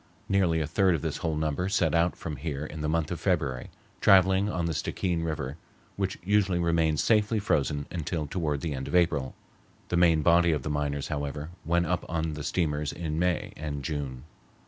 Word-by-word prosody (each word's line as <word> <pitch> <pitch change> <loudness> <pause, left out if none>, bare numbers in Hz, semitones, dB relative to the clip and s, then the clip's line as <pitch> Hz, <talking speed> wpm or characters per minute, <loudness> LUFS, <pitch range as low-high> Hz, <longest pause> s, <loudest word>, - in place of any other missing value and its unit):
Nearly 90 -4 +2
a - - 0
third 90 +3 +2
of 75 - -4
this - - -2
whole 80 -2 -2
number 80 +4 -1
set 85 -5 +2
out 85 +1 +2
from 75 -3 -6
here 75 0 -4
in 75 0 -7
the 75 - -1
month 80 -1 0
of - - -3
February, 65 -2 -1 0.3
traveling 95 +1 +5
on 85 -4 -1
the 85 - -1
Stickeen 85 +2 -1
River, 75 -3 -3 0.4
which 95 -1 -2
usually 95 -2 +2
remains 85 -3 +2
safely 110 0 +3
frozen 75 -7 0
until 80 -2 -2
toward 75 -2 -2
the 80 -3 -2
end 65 -1 -5
of - - -2
April. 75 -7 +2 0.5
The 90 - +1
main 85 -3 +4
body 85 0 +5
of 75 -4 -2
the 75 - -2
miners, 70 -1 -2
however, 75 +1 -4 0.2
went 85 +1 +2
up - - -1
on 80 -1 -1
the 75 0 -6
steamers 75 -2 -1
in 80 -2 -3
May 90 -1 0
and 75 -2 -5
June. 70 -5 -4
80 Hz, 195 wpm, -28 LUFS, 75-85 Hz, 0.5 s, traveling